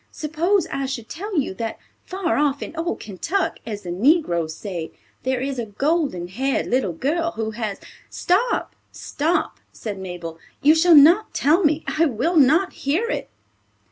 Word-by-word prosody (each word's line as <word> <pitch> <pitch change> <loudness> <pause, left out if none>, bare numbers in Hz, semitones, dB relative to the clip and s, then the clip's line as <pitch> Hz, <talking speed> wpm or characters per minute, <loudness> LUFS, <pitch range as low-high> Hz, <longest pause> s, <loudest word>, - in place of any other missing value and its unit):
Suppose 335 +6 0
I 275 -1 -2
should 250 -4 -5
tell 390 +3 -5
you 265 - -2
that 225 +3 -4 0.3
far 370 -2 -2
off 285 -1 +1
in - - -8
old 335 +2 -2
Kentuck, 320 - -2
as 210 -2 -5
the 175 - -5
negroes 175 - +2
say, 175 -5 -6 0.3
there 260 -1 -1
is 270 -1 -3
a 230 - -3
golden 275 - -1
haired 265 +9 -1
little 245 -7 0
girl, 330 - -1
who 220 0 -3
has—" 215 -2 -4 0.3
"Stop, 400 +8 0 0.2
stop," 320 +5 -2
said 205 -3 -6
Mabel. 175 -3 -7 0.2
"You 300 +2 +7
shall 330 +1 +5
not 340 +9 +6
tell 320 +7 +3
me. 310 0 +2
I 325 +2 +2
will 300 +8 -1
not 315 +7 +4
hear 355 - -1
it." - - -3
280 Hz, 165 wpm, -22 LUFS, 215-335 Hz, 0.3 s, You